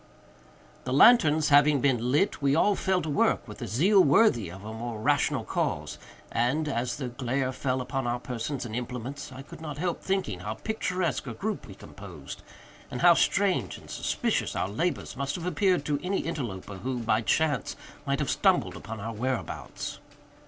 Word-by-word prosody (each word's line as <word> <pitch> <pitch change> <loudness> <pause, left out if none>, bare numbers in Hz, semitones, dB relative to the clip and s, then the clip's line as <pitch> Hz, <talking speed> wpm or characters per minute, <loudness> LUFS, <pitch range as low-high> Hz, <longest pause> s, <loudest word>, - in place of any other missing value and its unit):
The 125 - -3
lanterns 155 - +6
having 145 0 +6
been 125 -3 +1
lit, 150 +4 +1
we 140 0 +3
all 205 +5 +4
fell 190 -1 0
to 160 - -3
work 140 - +2
with - - -10
a - - -3
zeal 185 - +4
worthy 135 - +4
a 90 - -9
more 110 +3 -6
rational 110 - +1
cause; - - -2 0.3
and, 135 +7 +1
as 120 -3 -1
the 130 -3 -4
glare 130 +1 -1
fell 130 0 -1
upon 130 0 -3
our 120 +1 -1
persons 125 +2 -4
and 110 -2 -5
implements, 125 +3 -5
I 130 +1 -9
could 150 - -12
not 150 -3 -6
help 175 +2 -2
thinking 190 - -1
how 105 +4 -4
picturesque 180 - -2
a 120 - -5
group 215 0 -4
we 95 - -10
composed, 90 -8 -10 0.5
and 125 - -5
how 175 0 +8
strange 190 +2 +1
and - - -13
suspicious - - -1
our 95 - -1
labors 160 - -2
must 140 +1 -2
have 175 - -5
appeared 180 -2 +1
to 145 -1 0
any 190 +2 -1
interloper 105 - -5
who, 125 +7 -3
by 115 -2 +1
chance, 145 0 +1 0.3
might - - +1
have - - -1
stumbled - - +2
upon 110 +1 -7
our 115 +3 -5
whereabouts. 125 +3 -4
135 Hz, 180 wpm, -28 LUFS, 120-160 Hz, 0.5 s, how